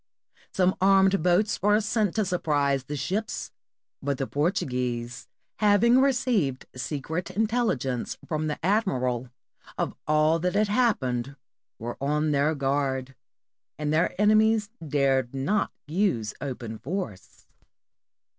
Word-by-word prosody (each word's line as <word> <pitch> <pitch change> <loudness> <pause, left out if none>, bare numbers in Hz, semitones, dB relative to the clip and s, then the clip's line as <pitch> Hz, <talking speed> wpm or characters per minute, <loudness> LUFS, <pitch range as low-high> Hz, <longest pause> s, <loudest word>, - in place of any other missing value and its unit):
Some 185 0 +2
armed 195 -1 +4
boats 180 +5 +2
were 210 +1 +4
sent 215 -2 0
to 215 -2 +1
surprise 145 -7 0
the 150 - -5
ships, 190 +11 -3 0.5
but 140 -1 -1
the 135 - -1
Portuguese, 125 -6 -2 0.3
having 220 +4 +4
received 240 - +1
secret 150 +7 -4
intelligence 210 - -1
from 155 -1 -2
the 150 - -2
admiral 130 - 0 0.5
of - - -1
all 155 +2 +3
that 180 +3 -1
had 210 0 +2
happened, 140 - 0 0.4
were 120 +2 -6
on 150 +2 +1
their 145 +2 +2
guard, 135 -1 -1 0.6
and 150 0 -1
their 165 +4 +1
enemies 215 0 +3
dared 135 -4 +1
not 195 +11 0
use 150 - 0
open 120 -5 -5
force. 115 - -6
155 Hz, 115 wpm, -26 LUFS, 135-205 Hz, 0.6 s, armed